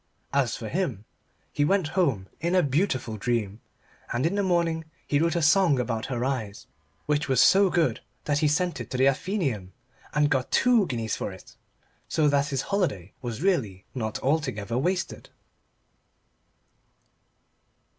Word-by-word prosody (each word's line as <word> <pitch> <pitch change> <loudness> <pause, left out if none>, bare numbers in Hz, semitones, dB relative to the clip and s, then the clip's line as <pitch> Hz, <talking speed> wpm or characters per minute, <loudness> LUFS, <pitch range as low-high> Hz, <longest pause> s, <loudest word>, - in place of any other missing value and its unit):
As 140 -3 +1
for 110 - -6
him, 130 - -2 0.5
he 145 - +1
went 180 +1 +2
home 140 - +1
in 170 +3 0
a 180 - +4
beautiful 130 - 0
dream, 110 -1 -2 0.5
and 120 +4 0
in 170 - +1
the 200 - +1
morning 170 -3 +1 0.2
he 145 - +1
wrote 165 +1 +1
a 170 - +1
song 165 -2 +4
about 115 -2 -2
her 125 -1 -2
eyes 115 -7 -3 0.4
which 150 0 0
was 130 -3 +3
so 195 +7 +6
good 170 -2 +1 0.2
that 145 -1 0
he 155 - +3
sent 175 +4 0
it - - -8
to 130 - -3
the 130 - +3
Athenæum, 135 - -1 0.4
and 150 -1 +3
got 130 -2 +1
two 240 -6 +4
guineas 115 -6 -2
for - - -4
it 95 - -14 0.5
so 155 -2 +2
that 140 0 +2
his 135 -1 -2
holiday 105 - -1
was 120 +3 -5
really 110 - 0
not 110 -4 -3
altogether 130 -7 -1
wasted. 175 +8 -2
140 Hz, 155 wpm, -26 LUFS, 120-170 Hz, 0.5 s, so